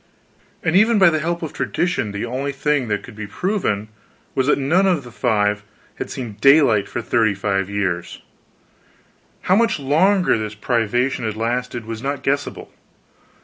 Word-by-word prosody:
And 160 - +1
even 220 +3 +5
by 190 -4 +6
the 155 - 0
help 170 +2 -2
of 160 - -5
tradition 175 - -1
the 100 +2 -4
only 130 +4 -3
thing 140 -1 0
that 105 -1 -2
could 120 - -12
be 105 -1 -6
proven 110 - -2 0.4
was 130 0 0
that - - +4
none 165 +8 +2
of 175 -7 +1
the 120 - -11
five 105 -4 +1 0.4
had - - -5
seen 115 -5 -6
daylight 135 -7 +5
for 120 - -4
thirty 110 -3 +2
five 100 -1 -1
years: 95 -4 -2 1.2
how 185 - +2
much 230 -5 +2
longer 165 - +3
this 105 -1 -5
privation 120 +3 0
has 110 -1 -2
lasted 120 +1 -2
was 115 0 -6
not 140 +1 -3
guessable. 140 +1 -2
125 Hz, 165 wpm, -20 LUFS, 110-155 Hz, 1.2 s, by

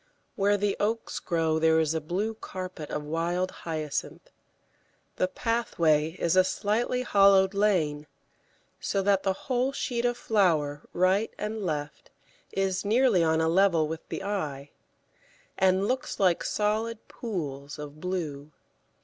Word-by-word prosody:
Where 205 +1 +2
the 200 0 0
oaks 225 +2 -1
grow 160 -2 0
there 160 0 +4
is 160 -1 +1
a 160 - -1
blue 190 +8 -2
carpet 185 -7 -7
of 150 - -3
wild 170 +4 -1
Hyacinth; 155 -3 -5 0.9
the 185 - +2
pathway 165 -9 +1
is 170 +1 +1
a 185 - +7
slightly 230 +6 0
hollowed 195 -3 +5
lane, 165 -8 +1 0.7
so 195 - -1
that 200 -1 +3
the 190 -1 +1
whole 255 0 +1
sheet 245 -3 -2
of 245 0 +1
flower 160 -11 +1
right 185 +5 +2
and 215 +1 -4
left 150 -4 -4 0.4
is 190 -1 0
nearly 220 -3 +3
on 160 0 +2
a 160 - +2
level 170 -2 +3
with 160 +1 -5
the - - -4
eye, 150 -9 -3 0.8
and 190 +1 +3
looks 255 +2 -2
like 185 -4 +3
solid 215 +2 -1
pools 145 - -5
of 150 0 -9
blue. 155 -6 -4
185 Hz, 140 wpm, -27 LUFS, 160-210 Hz, 0.9 s, a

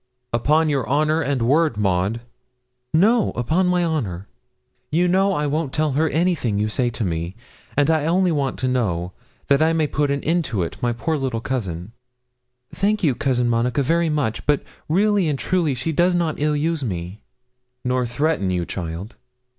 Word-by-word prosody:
'Upon 150 +7 +3
your 140 -5 -1
honour 155 +3 +2
and 140 -4 0
word, 145 0 +2
Maud?' 100 +3 0 0.7
'No, 210 +7 +4
upon 160 +10 +1
my 180 -1 +2
honour.' 105 - -2 0.6
'You 175 +4 +3
know 195 +2 +3
I 150 -4 0
won't 150 -1 -1
tell 155 0 0
her 155 +4 +1
anything 155 - 0
you 105 +1 0
say 120 +3 0
to 115 - -3
me; 85 0 -3 0.4
and 145 - +4
I 155 -1 +1
only 180 +1 +2
want 140 -4 -1
to 130 - +1
know, 90 -9 -1 0.3
that 140 +1 +3
I 160 +1 +3
may 160 -1 +2
put 145 0 0
an 140 0 -1
end 170 +2 +1
to 105 -9 -1
it, 85 - -5
my 120 - +1
poor 155 +7 -1
little 130 -4 -2
cousin.' 100 -7 -4 0.8
'Thank 210 +1 0
you, 145 -6 +3
Cousin 125 -1 0
Monica 120 +4 +1
very 165 +4 +2
much; 145 -8 -1
but 145 -1 +2 0.3
really 200 +2 +3
and 145 -2 0
truly 160 +2 0
she 130 +6 -2
does 175 +3 +2
not 165 -3 -1
ill 150 +1 +1
use 160 0 -1
me.' 90 -2 -5 0.6
'Nor 125 -1 +1
threaten 145 -5 0
you, 90 -2 -1
child?' 85 +5 -5
140 Hz, 180 wpm, -22 LUFS, 115-160 Hz, 0.8 s, No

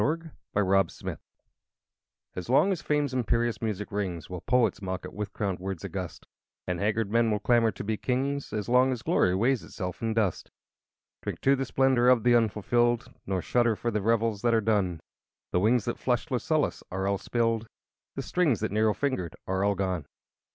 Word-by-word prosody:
Three 155 +3 +2 0.4
Quatrains 95 -3 +2
I - - -3 1.2
As 90 +4 -6
long 140 +10 +4
as 185 - -2
Fame's 145 -2 0
imperious 120 -3 0
music 105 -2 -3
rings 95 -5 -3
Will 90 -2 -5
poets 125 -3 +2
mock 95 -1 -4
it - - -8
with 105 -1 -4
crowned 100 -3 -2
words 95 -2 -5
august; - - -6 0.4
And 90 -1 -2
haggard 105 0 0
men 115 0 +3
will 105 - +1
clamber 115 +1 +3
to 95 - -6
be 110 +1 -1
kings 135 +4 -1
As 105 -2 -3
long 125 +2 +4
as 125 -3 -4
Glory 90 - +2
weighs 120 +5 +2
itself 90 -3 -6
in 115 -1 -1
dust. 105 -6 0
II - - -34 0.7
Drink - - -5
to 135 +1 +4
the 135 0 -2
splendor 130 -2 +3
of 125 -4 +4
the 120 - +5
unfulfilled, 120 +1 +2
Nor 95 -2 -1
shudder 120 -2 +2
for 120 +3 -2
the 105 -1 -1
revels 115 -1 +1
that 120 -1 +3
are - - +4
done: 100 -6 0 0.5
The - - +2
wines 110 +4 +3
that - - -3
flushed - - -1
Lucullus - - 0
are 95 +1 -2
all 100 0 0
spilled, 115 -1 0 0.5
The - - -3
strings 165 -10 +1
that 110 - -1
Nero 110 0 +2
fingered 130 - -2
are 95 +1 -1
all 100 0 +2
gone. 90 -6 -2
110 Hz, 195 wpm, -28 LUFS, 95-120 Hz, 1.2 s, the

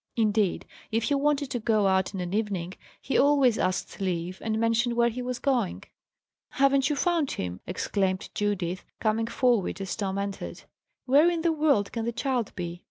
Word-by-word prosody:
Indeed, 215 -4 +1 0.3
if 225 +1 +1
he 290 - +1
wanted 285 -1 +1
to 245 - -1
go 215 -2 +2
out 190 +1 +1
in 185 - -3
an 175 +1 -4
evening, 195 -5 -2 0.3
he 270 - 0
always 275 -5 +4
asked 185 +2 -2
leave, 180 -1 -2
and 220 -1 -1
mentioned 230 +1 +1
where 235 0 +3
he 245 +2 -5
was 250 0 -3
going. 250 -10 0 0.7
"Haven't 275 0 +3
you 295 - +1
found 330 -1 +1
him?" 90 0 -4
exclaimed 190 +1 -1
Judith, 190 -4 -1 0.2
coming 225 +1 +1
forward 235 -6 +1
as 195 -1 -3
Tom 195 -2 -2
entered. 200 0 -5 0.4
"Where 290 +6 +5
in 335 -2 -2
the 335 - +3
world 295 -10 +2
can 230 -1 -3
the 235 - 0
child 245 -2 -1
be?" 175 -2 -5
225 Hz, 180 wpm, -27 LUFS, 190-265 Hz, 0.7 s, Where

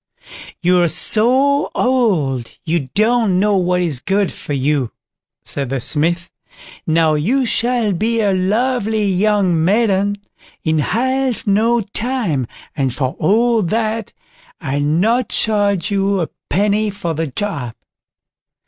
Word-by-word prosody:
"You're 175 0 +3
so 260 - +3
old, 180 - 0
you 160 -5 -1
don't 220 -3 +2
know 205 +1 +2
what 180 0 +1
is 160 -8 -1
good 195 +6 0
for 145 - -6
you", 140 -2 0 0.5
said 140 -3 -4
the 135 0 -2
Smith; 165 +6 0 0.6
"now 160 -1 +3
you 230 - +1
shall 235 -3 +1
be 225 +6 0
a 205 -3 +2
lovely 220 +3 0
young 190 -3 +1
maiden 200 +1 +2 0.5
in 160 -1 +1
half 260 - -1
no 225 +4 +2
time, 210 - -2 0.3
and 135 -2 0
for 130 +1 -3
all 225 +6 +2
that, 220 +3 -2 0.5
I'll 140 -3 -2
not 195 - +1
charge 205 -2 0
you 195 0 +1
a 165 - -3 0.2
penny 210 +2 +1
for 190 -5 -4
the 160 +1 -2
job." 140 - -4
200 Hz, 125 wpm, -17 LUFS, 160-225 Hz, 0.6 s, You're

